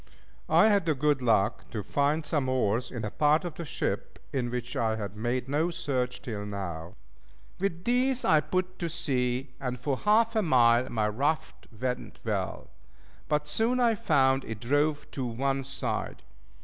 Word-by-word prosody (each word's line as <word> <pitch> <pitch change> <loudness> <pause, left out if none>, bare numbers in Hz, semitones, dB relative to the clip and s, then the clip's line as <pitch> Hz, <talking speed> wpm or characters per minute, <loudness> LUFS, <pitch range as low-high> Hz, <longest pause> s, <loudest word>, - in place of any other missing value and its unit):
I 220 - +6
had 200 -5 +2
the 155 - +3
good 145 0 +1
luck 110 -5 +1
to 105 -3 -4
find 145 +6 +1
some 145 -3 0
oars 120 -2 +1
in 115 -4 -5
a 105 - -4
part 155 +4 +3
of 175 - -4
the 170 - -6
ship, - - -3 0.2
in 125 -3 -1
which 125 0 -4
I 110 -1 +1
had 105 -2 -5
made 120 +4 -2
no 150 +5 +1
search 130 -7 -2
till 110 -6 -4
now. 90 -5 -5 0.6
With 175 -3 -2
these 250 +2 +1
I 155 - +5
put 185 +4 -2
to 170 - -2
sea, 130 -5 -1
and 125 -2 -3
for 135 +1 -1
half 225 - +3
a 220 - +4
mile 125 - +4
my 110 -2 0
raft 105 - -2
went 125 0 -3
well; - - -3 0.6
but 150 -1 +1
soon 225 +11 +1
I 235 -2 +4
found 135 -8 +2
it 110 -2 -6
drove 145 +5 +1
to 135 - -4
one 135 +3 -1
side. 135 +1 -3
135 Hz, 175 wpm, -28 LUFS, 120-160 Hz, 0.6 s, I